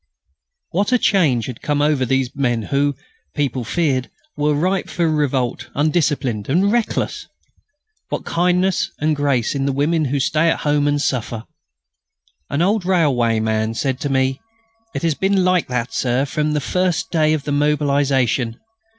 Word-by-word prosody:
_" - - -56 0.7
What 200 +6 0
a 250 - +5
change 155 - +2
had 125 -3 -7
come 145 -1 0
over 145 -3 +2
these 130 0 0
men 120 -5 0
who, 140 +4 0 0.4
people 135 -4 -1
feared, 130 0 0 0.3
were 150 0 +1
ripe 185 +5 0
for 170 -2 0
revolt, 130 -5 -1
undisciplined, 145 - 0
and 185 +8 +3
reckless! 235 -1 -1 0.8
What - - -4
kindness 180 +2 +1
and 155 +1 +1
grace 140 -5 0
in 140 -1 -1
the - - +1
women 150 +4 +1
who 140 +1 -1
stay 155 +4 +2
at - - 0
home 145 -1 +1
and 145 0 +1
suffer! 120 -5 -2 1.1
An 155 - 0
old 205 +2 +1
railwayman 115 -10 +1
said 130 +1 -1
to 145 - -2
me: 130 0 0 0.5
"It - - -3
has 165 -2 +2
been 190 +4 +1
like 185 -2 +2
that, 125 -1 -3
Sir, 125 +2 +1
from 150 +2 -1
the 150 - 0
first 180 +4 -1
day 155 -2 +3
of 155 -3 -1
the 145 - -3
mobilisation. 140 -5 +1
145 Hz, 160 wpm, -20 LUFS, 130-165 Hz, 1.1 s, a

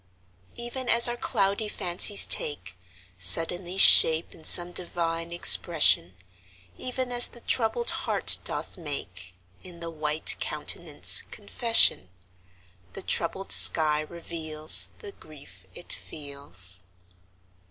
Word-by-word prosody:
Even 240 +1 -7
as 235 +1 +3
our 240 - -8
cloudy 200 -2 -5
fancies 190 +1 +2
take 145 -10 -3 0.4
Suddenly 175 - -1
shape 160 -3 +4
in 160 - -20
some 175 +2 +6
divine 170 -1 -6
expression, 145 - +3 0.6
Even 255 0 -6
as 245 0 +6
the 240 - -17
troubled 250 - -3
heart - - 0
doth - - -8
make 95 - -10 0.3
In 175 -2 -14
the 170 0 -11
white 155 0 -1
countenance - - 0
confession, 230 - +2 0.8
The - - -10
troubled 190 +3 -4
sky 155 -2 +3
reveals 155 -1 -2
The 420 -3 -13
grief 95 - -20
it 175 - -5
feels. 140 - -9
170 Hz, 110 wpm, -21 LUFS, 150-195 Hz, 0.8 s, some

